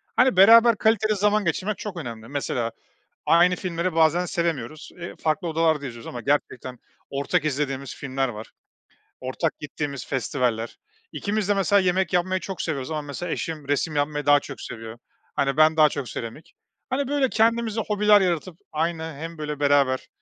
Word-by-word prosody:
hani, 250 -4 +4
beraber 230 +4 +8
kaliteli 215 0 +2
zaman 210 +1 +2
geçirmek 185 +5 -1
çok 205 -4 -6
önemli. 115 -7 -7
Mesela 125 -4 -2 0.6
aynı 175 +2 +5
filmleri 175 -1 -2
bazen 165 +2 +3
sevemiyoruz, 155 -5 -3
eee, 170 0 -7
farklı 165 +3 0
odalarda 160 -3 +1
izliyoruz 120 -2 -9
ama 120 - -6
gerçekten 130 -1 -2 0.3
ortak 145 +4 0
izlediğimiz 140 -2 -2
filmler 135 -1 -2
var. 110 -2 -8 0.7
Ortak 130 +5 -2
gittiğimiz 140 -3 -5
festivaller. 125 -3 -1 0.3
İkimiz 205 -1 -2
de - - +5
mesela 200 0 +3
yemek 185 +1 +1
yapmayı 185 +1 +1
çok 190 -2 -5
seviyoruz 140 -4 -3
ama 155 -1 -2
mesela 150 +4 -5
eşim 155 -4 -4
resim 145 +2 0
yapmayı 145 0 -1
daha 145 0 +6
çok 140 -1 -9
seviyor. 115 0 -8 0.4
Hani, 135 0 0
ben 155 +1 +5
daha 155 -1 +6
çok 140 -4 -5
seramik. 115 +7 -8 0.4
Hani, 270 +1 -1
böyle, 280 -1 +1
kendimize 225 0 +1
hobiler 210 0 +5
yaratıp 175 -1 -1
aynı 160 +1 -1
hem, 165 +2 -7
böyle, 150 -1 -5
beraber, 140 -2 +2
160 Hz, 160 wpm, -24 LUFS, 140-185 Hz, 0.7 s, beraber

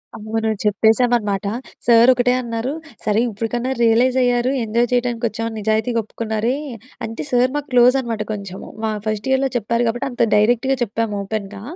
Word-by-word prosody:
అవును. 220 +1 -2
చెప్పేసామనమాట. 220 -1 +2 0.4
సార్ 235 +1 +6
ఒకటే 250 0 +2
అన్నారు. 235 +2 -3 0.3
సరే 210 0 +2
ఇప్పటికన్నా 235 +4 -3
రియలైజ్ 240 +3 +3
అయ్యారు 245 +1 +2
ఎంజాయ్ 235 +2 +1
చేయడానికి 240 -1 0
వచ్చామని 225 0 -4
నిజాయితీగా 220 +3 0
ఒప్పుకున్నారే. 220 +3 -2 0.5
అంటే 225 +1 -6
సార్ 250 +1 +3
మాకు 295 0 -3
క్లోజ్ 250 +1 +6
అనమాట 230 -4 -4
కొంచెం 195 -2 -7 0.2
మా 220 - 0 0.2
ఫస్ట్ 215 +1 -2
ఇయర్‍లో 265 0 +2
చెప్పారు 235 +1 0
కాబట్టి 245 +4 -1
అంత 245 - -4
డైరెక్ట్‌గా 240 +5 +2
చెప్పాము 225 -1 -2
ఓపెన్‌గా. 200 -1 -5
230 Hz, 150 wpm, -20 LUFS, 215-245 Hz, 0.5 s, సార్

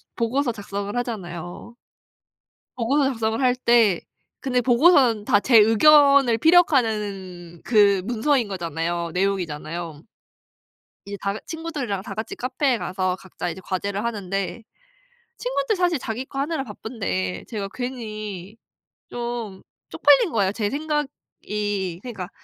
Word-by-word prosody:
보고서 245 +3 0
작성을 200 -1 -5
하잖아요. 185 -3 -6 1.0
보고서 265 +4 +1
작성을 225 -2 -1
할 250 -2 +3
때 235 -7 +3 0.4
근데 250 -3 0
보고서는 245 -3 +4
다 205 -3 +3
제 240 +2 +4
의견을 275 +2 +6
피력하는 210 - +1
그 205 -4 +4
문서인 240 +2 +1
거잖아요, 170 -2 -3
내용이잖아요. 170 -4 -3 1.0
이제 200 0 -5
다 200 +1 -2
친구들이랑 300 - -4
다 195 - -7
같이 220 +2 -5
카페에 255 0 0
가서 185 -1 -2
각자 190 -2 -6
이제 180 +3 -8
과제를 200 +3 -3
하는데 195 -1 -3 0.8
친구들 - - -1
사실 355 -3 +1
자기 235 +1 -4
거 270 - -8
하느라 300 +1 -1
바쁜데 95 - -4
제가 205 -3 -4
괜히 215 -6 -6 0.5
좀 235 -5 -5 0.3
쪽팔린 470 -8 +4
거예요. 200 -4 +1
제 210 -2 -1
생각이 210 - -3
그러니까 205 -7 -7
220 Hz, 285 characters per minute, -23 LUFS, 190-255 Hz, 1.0 s, 의견을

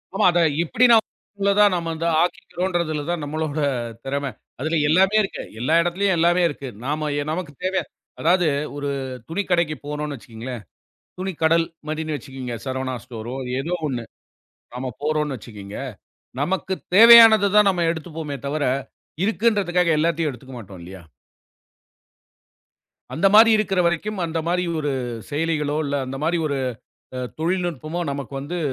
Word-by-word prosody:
ஆமா. - - +2
அதை 175 - +2 0.2
எப்படி 225 +9 +2
நாம 225 -1 +6 0.4
உள்ளதா 200 +1 +5
நாம 170 -2 -2
இந்த 165 +1 -3 0.2
ஆக்கிக்கிறோம்ன்றதுல 175 -3 -2
தான் 175 -3 -1
நம்மளோட 155 0 -3 0.5
திறமை. 140 0 -2 0.3
அதுல 160 +4 0
எல்லாமே 190 +6 +4
இருக்கு. 195 - -4 0.2
எல்லா 140 +7 +1
இடத்துலயும் 185 +3 +1
எல்லாமே 175 +2 +3
இருக்கு. 140 -3 -6 0.2
நாம 150 +1 -1 0.2
நமக்குத் 160 -5 -5
தேவை. 185 +1 +1 0.4
அதாவது 175 +1 +3 0.3
ஒரு 145 0 -3 0.4
துணிக்கடைக்குப் 170 -5 -1
போகணும்னு 150 0 -4
வச்சுக்கோங்களேன். 115 +1 -8 0.6
துணிக்கடல் 165 -3 +1 0.2
மதினே 155 0 -2
வச்சுக்கோங்க. 130 -4 -6
சரவணா 130 -1 -3
ஸ்டோர் 120 -1 -7 0.3
ஏதோ 165 +6 -3
ஒண்ணு 120 -4 -4 0.7
நாம 130 0 -4
போறோம்னு 150 -3 0
வச்சுக்கோங்க. 105 -3 -9 0.6
நமக்குத் 190 +4 -2
தேவையானது 225 -2 +9
தான் 210 -1 +6
நாம 175 -3 0
எடுத்துப் 160 -1 -7
போவோமே 145 -3 -4
தவர, 150 +1 -1 0.6
இருக்குன்றதுக்காக 200 -6 +1
எல்லாத்தையும் 165 -2 +1
எடுத்துக்க 130 +1 -11
மாட்டோம் 95 -4 -11
இல்லையா? 95 +1 -10 2.1
அந்த 180 +5 +3
மாரி 225 +1 +9
இருக்கிற 195 -3 0
வரைக்கும், 185 +4 -1
அந்த 165 0 -2
மாரி 180 +1 +1 0.2
ஒரு 145 -1 -1 0.4
செயலிகளோ 150 -1 -1
இல்ல, 140 0 -2
அந்த 135 +1 -5
மாரி 170 +2 +1
ஒரு 140 -1 -2 0.6
அ - - -3 0.2
தொழில்நுட்பமோ 170 -1 -2
நமக்கு 140 -1 -5
வந்து 170 +6 -4
160 Hz, 135 wpm, -22 LUFS, 140-180 Hz, 2.1 s, தேவையானது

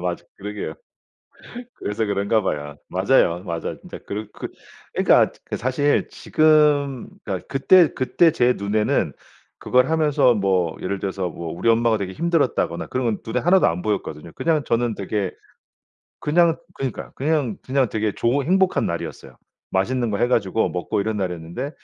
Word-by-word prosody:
맞아 90 -1 -3
그러게요. 105 +1 -5 1.0
그래서 105 +2 -3
그런가 100 +2 +1
봐요. 75 -6 -3
맞아요 95 -3 +2
맞아. 85 -3 -4
진짜 - - -10
그러 105 +2 -4
그 - - -6 0.5
그니까 - - +4
그 - - -4
사실 130 +4 +1
지금 150 -4 +2 0.2
그니까 95 -4 -4
그때 160 +5 +5
그때 160 +5 +3
제 125 -5 +3
눈에는 105 +1 0 0.5
그걸 125 +1 +2
하면서 150 -5 +3
뭐 95 -5 +1
예를 95 +1 -2
들어서 95 -2 -2
뭐 85 -1 -6
우리 115 - 0
엄마가 115 -1 +3
되게 95 -2 -4
힘들었다거나 145 - 0
그런 130 0 -2
건 110 -3 0
눈에 115 +2 -1
하나도 180 +6 +4
안 85 +2 -1
보였거든요. 85 -6 -3
그냥 160 -3 +1
저는 115 -4 0
되게 100 -1 -2 0.9
그냥 165 +2 +3 0.2
그러니까요 135 -2 -5
그냥, 145 -3 0
그냥 130 -1 +1
되게 110 -1 -1
좋은 135 +4 0
행복한 190 +1 +2
날이었어요. 70 -6 -6 0.3
맛있는 120 +5 0
거 100 - -1
해 120 +2 +2
가지고 110 -3 +1
먹고 90 +3 -2
이런 110 +1 -2
날이었는데 90 - -4
110 Hz, 350 characters per minute, -22 LUFS, 95-140 Hz, 1.0 s, 그때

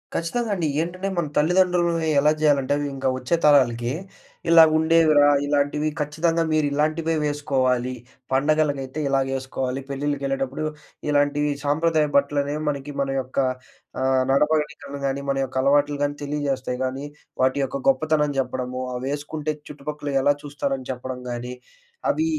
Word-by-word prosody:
ఖచ్చితంగా 225 +8 -1
అండి. 170 -4 -1
ఏంటంటే 185 +3 -3
మన 170 -3 0
తల్లిదండ్రులని 170 0 +2
ఎలా 150 +2 +4
జేయాలంటే 145 -3 +3
అవి 145 - -2
ఇంకా 135 0 -2
వచ్చే 130 +6 0
తరాలకి, 120 -5 +4 0.6
ఇలా 165 -1 +9
ఉండేవిరా. 160 -2 +5 0.2
ఇలాంటివి 145 +1 +1
ఖచ్చితంగా 165 +3 0
మీరు 155 -1 +2
ఇలాంటివే 155 +2 0
వేసుకోవాలి. 130 -4 0 0.4
పండగలకైతే 145 0 +1
ఇలాగేసుకోవాలి, 135 -1 -1
పెళ్ళిళ్ళకెళ్ళేటప్పుడు 140 0 -2 0.4
ఇలాంటీ 145 0 +2 0.2
సాంప్రదాయ 155 +1 +2
బట్టలనేవి 145 +1 +1
మనకి 140 0 -4
మన 135 - -1
యొక్క 130 +2 -13 0.6
ఆహ్, 130 0 +2
నడవడికలని 150 -1 0
గానీ 135 +1 -2
మన 135 - +1
యొక్క 130 0 -7
అలవాట్లు 145 +1 +3
గానీ 145 0 -1
తెలియజేస్తాయి 140 -3 -2
గానీ, 135 +2 -4 0.4
వాటి 130 +2 +2
యొక్క 135 +1 -3
గొప్పతనం 150 +2 +2
జెప్పడము. 130 -1 -2
అవేసుకుంటే 145 +4 -3 0.2
చుట్టుపక్కల 150 0 -6
ఎలా 145 +1 +4
చూస్తారని 140 -2 -3
చెప్పడం 125 0 -6
గాని, 120 +1 -5 0.6
అవి 320 - 0
145 Hz, 125 wpm, -23 LUFS, 135-155 Hz, 0.6 s, ఇలా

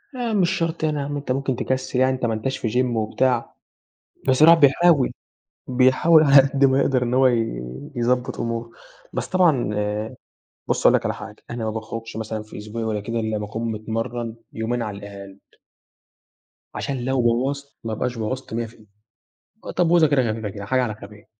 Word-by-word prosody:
يعني 240 -3 -2
مش 175 -2 +3
شرط 165 -3 -2
يعني 150 -2 0
أنت 145 -2 -4
ممكن 135 0 -1
تكسِّل 130 +1 -2
يعني 130 0 +4
أنت 130 - -3
ما 115 - 0
أنتاش 120 +5 -2
في 115 - -2
gym 125 +2 +2
وبتاع، 120 +2 0 0.7
بس 130 +1 +3
الواحد 165 +2 +8
بيحاول، 145 0 +4 0.6
بيحاول 130 +6 +5
على 140 -1 +6
قد 140 0 +1
ما 135 0 +4
يقدر 130 -2 +2
إن 120 0 0
هو 130 +1 +5
ي 115 - 0 0.3
يضبّط 125 +1 0
أموره. 115 0 -3 0.4
بس - - -3
طبعًا 155 - +2 0.9
بُص - - +1
هاقول - - +6
لك - - 0
على - - 0
حاجة، - - -9
أنا 120 -1 -4
ما - - -1
باخرُجش 110 0 -6
مثلًا 110 -1 -4
في 110 - -12
أسبوعي 110 +2 -5
والّا 110 -1 -1
كده 115 +3 -3
إلّا 110 -1 -1
ما 105 - -4
أكون 110 +2 -4
متمرَّن 115 +2 -4 0.2
يومين 115 +2 -2
على 105 -3 -4
الأقل. 100 -1 -10 1.4
عشان 135 -3 -3
لو 130 0 +1
بوَّظت 135 +4 -1
ما 115 - -3
أبقاش 125 +3 -2
بوَّظت 120 +2 -4
100 115 0 -1
في 110 - -15
ال 110 - -20 0.8
آآ - - -3
تبويظة 170 -2 +4
كده 140 -3 +2
خفيفة 110 -1 -4
كده، 100 0 -8
حاجة 130 +5 +1
على 110 -4 -3
خفيف. 105 0 -13
120 Hz, 185 wpm, -22 LUFS, 110-135 Hz, 1.4 s, الواحد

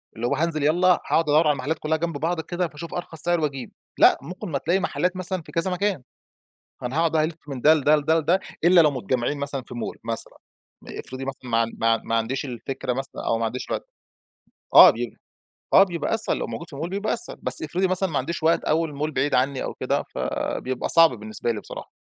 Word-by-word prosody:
اللي 115 +2 -2
هو 140 - +1
هانزِل 155 0 -1
يالّا 170 +5 +3
هاقعُد 170 -2 +3
أدوّر 155 +2 +4
على - - +5
المحلّات 145 +4 -3
كلّها 160 +1 0
جنب 165 -1 -3
بعض 165 +3 -1
كده 175 +2 -2
فاشوف 165 +2 -9
أرخَص 165 -3 -3
سِعر 175 0 +1
وأجيب، 140 -5 -3 0.3
لأ - - +7
ممكن 180 +8 -7
ما 145 - -1
تلاقي 170 +7 +1
محلّات 180 -1 -1
مثلًا 185 0 -3
في - - -14
كذا 170 +3 -1
مكان، 185 -5 -1 0.8
أنا 125 +3 -3
هاقعُد 165 -1 +2
بقى 155 -1 +3
ألِفّ 160 0 -3
من 135 -3 -5
ده 155 +5 +6
لده، 150 0 +4
لده، 160 +2 +2
لده، 170 +4 +2 0.2
إلّا 175 0 +7
لو 155 -2 +5
متجمّعين 130 +1 -2
مثلًا 140 -1 -3
في 125 - -11
Mall 120 - -5
مثلًا، 115 0 -4 0.5
آآ - - -6
افرضي 130 +1 -7
مثلًا 135 -2 -7
ما 115 0 +3
ما 115 0 +3
ما 115 - -2
عنديش 115 +6 -1
الفكرة 130 0 -4
مثلًا 135 +2 -5
أو 115 - +1
ما 115 - -1
عنديش 120 +3 -4
وقت، - - -3 0.9
آه - - +11
بي - - -3 0.6
آه 195 - +9
بيبقى 175 -1 -2
أسهل 225 0 +1
لو - - -3
موجود 170 - -7
في 140 - -10
Mall 155 +4 -3
بيبقى 200 +3 -1
أسهل 360 - -3
بس - - 0
افرضي 185 +2 0
مثلًا 185 +1 0
ما 150 - -1
عنديش 160 +5 -3
وقت 165 +1 +3
أو 160 +2 +1
الMall 150 +1 -3
بعيد 145 0 0
عنّي 130 +1 +1
أو - - -4
كده - - -1
فبيبقى 130 -1 -3
صعب 165 -1 +7
بالنسبة 110 +2 -3
لي 110 - -4
بصراحة. - - -9
155 Hz, 225 wpm, -24 LUFS, 135-170 Hz, 0.9 s, آه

